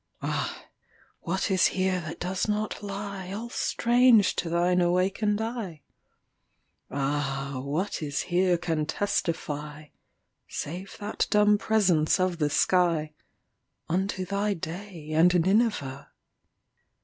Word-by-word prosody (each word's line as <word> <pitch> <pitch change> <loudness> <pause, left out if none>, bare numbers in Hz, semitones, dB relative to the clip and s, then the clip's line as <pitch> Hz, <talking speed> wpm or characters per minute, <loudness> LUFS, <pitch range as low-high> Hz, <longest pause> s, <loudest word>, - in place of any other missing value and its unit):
Ah! - - -3 0.5
what 190 +4 -2
is 185 -2 +5
here 185 -1 0
that 160 -1 -7
does 185 +3 -2
not 210 0 -1
lieAll 200 +2 -6
strange 240 -5 +4
to 170 - -1
thine 175 +2 +2
awakened 190 +4 +1
eye? 220 - -4 1.1
Ah! 140 -1 -2
what 160 +9 -2
is 145 -2 -2
here 180 0 +2
can 160 -3 -1
testify(Save 155 0 -5
that 210 -1 -2
dumb 210 0 +4
presence 195 -9 +2
of 185 -2 0
the 150 - +2
sky)Unto 175 +3 -1
thy 200 +1 0
day 170 -1 -7
and 175 +3 +5
Nineveh? 185 - +1
180 Hz, 100 wpm, -27 LUFS, 155-205 Hz, 1.1 s, is